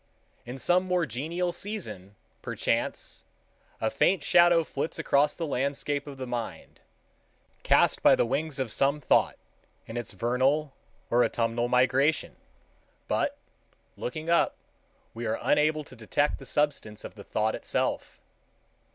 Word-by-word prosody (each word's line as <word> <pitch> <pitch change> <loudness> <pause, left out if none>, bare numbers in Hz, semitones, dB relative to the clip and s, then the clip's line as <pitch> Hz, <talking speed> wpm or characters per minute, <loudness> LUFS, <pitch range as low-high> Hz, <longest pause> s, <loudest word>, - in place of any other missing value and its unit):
In 125 +2 -6
some 180 +7 +3
more 180 -2 +1
genial 165 +7 -2
season, 110 - -5 0.3
perchance, - - -2 0.6
a 110 - 0
faint 190 0 +2
shadow 175 -1 +5
flits 150 0 -4
across 150 -2 +2
the 165 - -3
landscape 140 +1 -2
of 140 -2 -8
the 130 - -5
mind, 120 -2 -6 0.8
cast - - +3
by - - +7
the - - +2
wings 140 +4 -2
of 130 -5 -2
some 140 +5 +1
thought 145 - +2 0.5
in 115 - -7
its 120 - -5
vernal 130 +7 +1 0.4
or 120 +1 +5
autumnal 115 +1 0
migration, 130 +5 +2 0.7
but, - - 0 0.6
looking 155 +6 -5
up, 170 0 +3 0.6
we 115 0 -4
are 110 - 0
unable 155 +1 +2
to 130 - -15
detect 125 +6 0
the 135 - -8
substance 140 -8 -1
of - - -8
the 100 - -11
thought 110 +2 0
itself. - - -2
140 Hz, 135 wpm, -28 LUFS, 120-155 Hz, 0.8 s, by